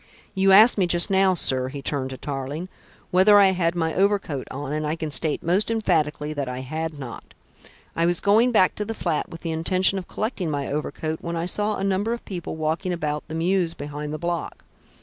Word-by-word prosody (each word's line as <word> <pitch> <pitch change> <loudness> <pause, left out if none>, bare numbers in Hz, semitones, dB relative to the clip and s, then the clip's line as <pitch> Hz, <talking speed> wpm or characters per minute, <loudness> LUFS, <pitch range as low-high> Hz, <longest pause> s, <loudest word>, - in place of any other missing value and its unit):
You 195 0 +3
asked 215 +3 +7
me 185 - +3
just 175 +3 +4
now, 190 -1 +4
sir," 130 -5 +1
he 140 +1 -7
turned 135 -3 -2
to 130 - -7
Tarling, 145 +6 -5 0.4
"whether 190 +3 +6
I 195 -1 +6
had 175 -2 0
my 160 -2 -1
overcoat 195 -8 0
on, 140 +1 -5
and 155 0 -2
I 155 - -1
can 160 -2 -5
state 155 +1 0
most 185 +7 +1
emphatically 155 -9 0
that 140 -3 -3
I 125 0 -5
had 155 +3 -4
not. 130 -5 -9 0.6
I 165 +1 +2
was 175 -1 +2
going 220 +5 +4
back 190 -5 +4
to 210 - -1
the 225 +2 -5
flat 165 -7 -2
with 165 - -10
the 165 - -3
intention 185 +4 +2
of 180 - -10
collecting 215 -6 -3
my 145 -2 -2
overcoat, 155 +2 -3
when 170 0 -4
I 165 0 -2
saw 210 +3 0
a - - -4
number 200 +4 0
of 235 - -7
people 175 -5 -5
walking 160 +3 -2
about 150 -3 -3
the 160 - -6
mews 170 0 0
behind 150 +1 -6
the 155 - -3
block. 170 -1 -4
165 Hz, 215 wpm, -24 LUFS, 150-190 Hz, 0.6 s, asked